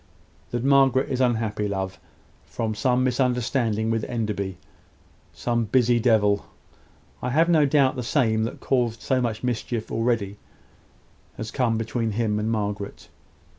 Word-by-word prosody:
"That 120 0 -3
Margaret 135 0 +4
is 130 0 0
unhappy, 110 -4 0
love, 95 -1 -3 0.5
from 110 -1 -3
some 125 +4 +1
misunderstanding 125 -3 0
with 115 -1 0
Enderby. 105 -6 -3 0.7
Some 120 -1 -1
busy 120 +1 +3
devil 105 -3 +2 0.7
I - - -2
have 160 +6 +3
no 155 -4 +4
doubt 135 -2 +3
the - - -2
same 115 -3 +1
that - - -1
has - - -15
caused 120 -4 0
so 130 -2 +1
much 115 -2 -2
mischief 120 -2 -2
already 115 -4 0 1.0
has 110 0 -5
come 120 -4 +1
between 115 0 -2
him 105 -1 0
and 110 +1 -1
Margaret." 105 -2 -4
115 Hz, 140 wpm, -24 LUFS, 110-125 Hz, 1.0 s, Margaret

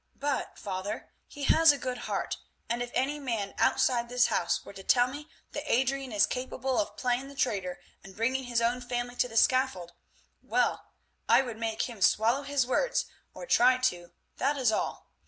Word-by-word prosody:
But, 285 -1 -2
father, 195 +2 -5 0.2
he 290 - -9
has 325 +2 +6
a 285 - -2
good 250 -1 -4
heart, - - -2 0.3
and 235 +1 -1
if 245 - -3
any 280 +3 0
man 230 -8 -3
outside 250 -3 +2
this 245 0 +3
house - - 0
were - - -10
to 195 - -9
tell 245 +5 +4
me 290 +4 -7 0.2
that 295 +1 -4
Adrian 265 +1 +1
is 205 -1 +4
capable 255 +3 -2
of 315 - -2
playing 250 +1 0
the 280 - -12
traitor 190 -9 -1 0.2
and 190 -1 -12
bringing 255 +4 0
his 240 -1 0
own 245 +2 +1
family 245 0 -3
to - - +2
the 225 -2 -5
scaffold, 240 -10 +2 0.5
well, - - 0 0.4
I - - +6
would 235 -4 -6
make 225 -1 -1
him 230 -5 -6
swallow 230 +8 +3
his 280 -2 0
words, - - +1 0.3
or - - -7
try 255 - +5
to, 175 -9 -1 0.3
that 290 +1 +1
is 250 -5 +2
all. - - -3
250 Hz, 190 wpm, -29 LUFS, 225-270 Hz, 0.5 s, has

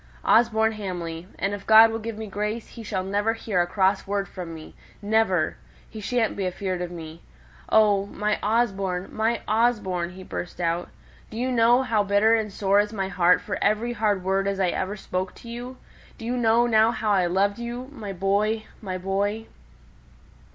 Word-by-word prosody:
Osborne 220 -1 +4
Hamley! 180 -5 -5
And 195 +1 -1
if 200 -1 -7
God 220 +1 +8
will 225 - -3
give 225 -1 -6
me 220 - -5
grace, 210 +2 -4
he 235 - -10
shall 200 -4 -3
never 205 +3 0
hear 215 -5 -1
a 175 - 0
cross 190 +1 +1
word 200 0 -1
from 180 -3 -7
me 160 -1 -10 0.3
never! 205 -6 +1 0.3
He 215 - -9
shan't 230 +1 0
be 195 -2 -1
afeard 185 0 -3
of 180 - -3
me. 165 -1 -9 0.5
Oh, 205 -2 +4
my 210 +1 -1
Osborne, 195 -5 0
my 225 +2 0
Osborne" 210 -6 +1
(he 185 0 -10
burst 180 -1 -6
out), 170 0 -1 0.4
"do 220 - -8
you 255 +2 -1
know 235 0 +5
now - - -2
how 225 -5 +1
bitter 205 +2 +3
and 220 -2 0
sore 200 0 +2
is 205 0 +1
my 195 -3 -3
heart 180 -1 +3
for 200 - -4
every 215 +4 +1
hard 210 -5 0
word 195 +1 0
as 200 -1 -1
I 185 -2 +2
ever 190 +4 -3
spoke 185 -1 -4
to - - -13
you? 245 +2 -7 0.4
Do 225 - -9
you 245 +2 -1
know 235 0 +3
now 220 -1 +4
how 220 -2 -1
I 185 -3 +3
loved 200 +4 +1
you 240 +2 -5
my 215 -7 -6
boy 200 +4 0 0.2
my 185 -3 -4
boy?" 200 +4 -1
205 Hz, 195 wpm, -25 LUFS, 190-225 Hz, 0.5 s, God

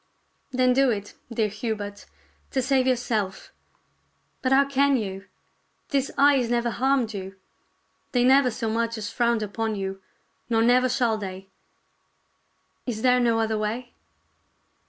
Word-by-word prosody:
"Then 255 -1 +2
do 270 +1 +4
it, 205 -3 -3 0.2
dear 225 -2 +1
Hubert, 210 -1 -5 0.4
to 265 - 0
save 260 0 +2
yourself. 225 -6 -1 0.9
But 260 - 0
how 275 +1 +5
can 275 0 +2
you? 195 -3 -5 0.6
These 275 -1 +1
eyes 275 -4 +4
never 235 0 +1
harmed 260 -2 +1
you. 195 -1 -6 0.8
They 245 -1 +2
never 265 +1 +5
so 225 0 -4
much 230 +1 -1
as 205 -1 -5
frowned 235 -2 +1
upon 220 +1 -2
you, 195 -1 -4 0.5
nor 225 -1 +3
never 250 +2 +4
shall 240 -4 +1
they. 190 -1 -7 1.4
Is 225 -3 -3
there 250 -1 +4
no 235 -2 +2
other 220 -1 0
way 235 +4 -3
235 Hz, 135 wpm, -25 LUFS, 215-255 Hz, 1.4 s, how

